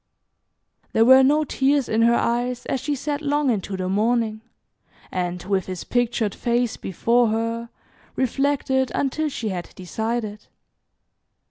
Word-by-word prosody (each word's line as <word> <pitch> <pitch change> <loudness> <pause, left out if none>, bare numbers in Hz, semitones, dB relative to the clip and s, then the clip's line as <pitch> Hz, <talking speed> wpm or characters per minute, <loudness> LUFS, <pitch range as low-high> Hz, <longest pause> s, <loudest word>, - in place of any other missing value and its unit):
There 225 - +4
were 260 +2 +8
no 295 +4 +4
tears 275 -1 +1
in 220 +1 +1
her 235 +1 +5
eyes 245 +1 -1
as 270 - -1
she 295 0 -1
sat 290 +2 -3
long 290 -2 +1
into 195 -3 -3
the 185 -1 -2
morning, 220 +2 0 0.7
and, 180 -1 -3
with 190 -1 -1
his 185 -2 -5
pictured 240 -4 0
face 240 -1 0
before 235 +6 +1
her, 230 +1 -2 0.5
reflected 265 0 0
until 300 +3 0
she 235 -6 -4
had 180 -3 -5
decided. 215 +2 -4
235 Hz, 135 wpm, -23 LUFS, 215-265 Hz, 0.7 s, were